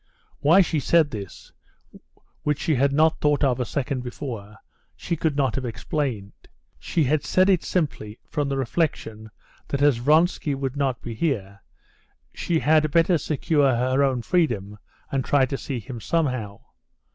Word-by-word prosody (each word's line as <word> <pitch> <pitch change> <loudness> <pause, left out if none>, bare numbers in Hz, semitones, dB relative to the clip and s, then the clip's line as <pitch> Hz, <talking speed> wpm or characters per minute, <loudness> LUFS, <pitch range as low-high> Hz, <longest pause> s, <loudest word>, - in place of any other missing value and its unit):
Why 165 +7 +5
she 165 -4 0
said 155 +2 +3
this, 100 -4 -8 0.9
which 150 -1 0
she 160 - 0
had 140 +1 +2
not 155 +3 +2
thought 150 0 +2
of 130 -2 +2
a 125 - 0
second 135 +2 -3
before, 115 -5 -7 0.4
she 170 - -3
could 155 -2 -1
not 135 -3 +1
have 135 - -3
explained. 115 -2 -3 0.5
She 165 - 0
had 145 +2 +1
said 185 +1 +3
it 185 - +2
simply 125 - -2
from 145 -2 -2
the 135 - -1
reflection 115 -6 -2 0.4
that 140 0 -1
as 145 -5 +4
Vronsky 150 +3 +2
would 135 -1 -4
not 135 -3 -1
be 120 - -5
here, 100 - -2 0.7
she 170 - -1
had 155 0 +3
better 165 +2 +3
secure 145 -2 +1
her 130 +3 +1
own 130 -3 0
freedom, 110 - 0 0.3
and 135 -1 0
try 140 0 +3
to 135 - -4
see 135 -2 -4
him 120 +1 -8
somehow. 125 -12 -2
140 Hz, 160 wpm, -24 LUFS, 120-155 Hz, 0.9 s, Why